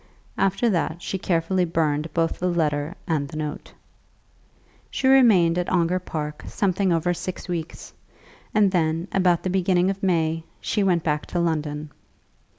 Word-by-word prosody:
After 195 Hz, +5 st, +2 dB
that 170 Hz, -5 st, 0 dB
she 190 Hz, -, -3 dB
carefully 180 Hz, +1 st, +1 dB
burned 160 Hz, -2 st, 0 dB
both 165 Hz, -1 st, 0 dB
the 180 Hz, -, 0 dB
letter 155 Hz, -1 st, 0 dB
and 155 Hz, -5 st, 0 dB
the 155 Hz, -, -8 dB
note. 150 Hz, -1 st, -5 dB, 1.2 s
She 275 Hz, -, -3 dB
remained 205 Hz, -11 st, +5 dB
at 180 Hz, -, -2 dB
Ongar 180 Hz, 0 st, +2 dB
Park 150 Hz, -4 st, -5 dB
something 195 Hz, -1 st, 0 dB
over 170 Hz, +1 st, +1 dB
six 180 Hz, +1 st, -6 dB
weeks, 170 Hz, -2 st, -5 dB, 0.6 s
and 205 Hz, -3 st, +3 dB
then, 165 Hz, -1 st, 0 dB
about 180 Hz, -3 st, +2 dB
the 185 Hz, -, -1 dB
beginning 185 Hz, 0 st, +2 dB
of 195 Hz, 0 st, -7 dB
May, 165 Hz, -3 st, +1 dB, 0.2 s
she 210 Hz, -, -1 dB
went 180 Hz, -4 st, +2 dB
back 150 Hz, -3 st, -1 dB
to 175 Hz, -, -2 dB
London. 150 Hz, -3 st, -2 dB
170 Hz, 155 wpm, -24 LUFS, 160-185 Hz, 1.2 s, remained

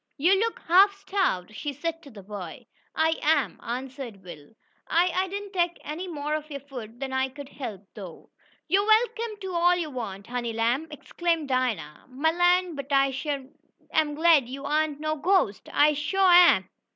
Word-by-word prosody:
"You 360 Hz, +7 st, +4 dB
look 455 Hz, +2 st, -1 dB
half 390 Hz, +4 st, +6 dB
starved," 380 Hz, -, -1 dB
she 290 Hz, +6 st, -4 dB
said 330 Hz, +4 st, -4 dB
to 285 Hz, -, -13 dB
the 210 Hz, -6 st, -12 dB
boy. 190 Hz, -4 st, -8 dB, 0.3 s
"I 320 Hz, +1 st, +2 dB
am," 300 Hz, -4 st, +1 dB
answered 250 Hz, -4 st, -6 dB
Will. 155 Hz, 0 st, -12 dB, 0.3 s
"I 350 Hz, +2 st, +2 dB
I 375 Hz, +1 st, +1 dB
didn't 400 Hz, +1 st, -6 dB
take 345 Hz, -2 st, 0 dB
any 325 Hz, +5 st, -5 dB
more 300 Hz, -3 st, -4 dB
of 305 Hz, 0 st, -3 dB
your 280 Hz, -2 st, -6 dB
food 245 Hz, -4 st, -10 dB
than 270 Hz, -1 st, -4 dB
I 265 Hz, 0 st, +1 dB
could 280 Hz, +1 st, -10 dB
help, 215 Hz, -10 st, -7 dB
though." 185 Hz, -6 st, -11 dB, 0.4 s
"Yo' 380 Hz, +5 st, +3 dB
am 410 Hz, -, -4 dB
welcome 450 Hz, -1 st, +2 dB
to 380 Hz, -1 st, -5 dB
all 350 Hz, +1 st, +4 dB
yo' 330 Hz, -4 st, -3 dB
want, 200 Hz, -6 st, -6 dB
honey 240 Hz, -1 st, -3 dB
lamb!" 235 Hz, +7 st, 0 dB
exclaimed 325 Hz, 0 st, -2 dB
Dinah. 225 Hz, -, -2 dB
"Mah 275 Hz, +5 st, 0 dB
land, 355 Hz, -1 st, +2 dB
but 280 Hz, 0 st, -7 dB
I 275 Hz, -1 st, +3 dB
shuah 275 Hz, 0 st, -4 dB, 0.4 s
am 305 Hz, -2 st, +1 dB
glad 310 Hz, -5 st, +4 dB
yo' 275 Hz, +2 st, -6 dB
ain't 305 Hz, -2 st, 0 dB
no 310 Hz, 0 st, -2 dB
ghostest! 320 Hz, -, +1 dB
I 300 Hz, +1 st, +4 dB
shuah 365 Hz, +6 st, +2 dB, 0.2 s
am!" -, -, -7 dB
295 Hz, 185 wpm, -26 LUFS, 255-350 Hz, 0.4 s, half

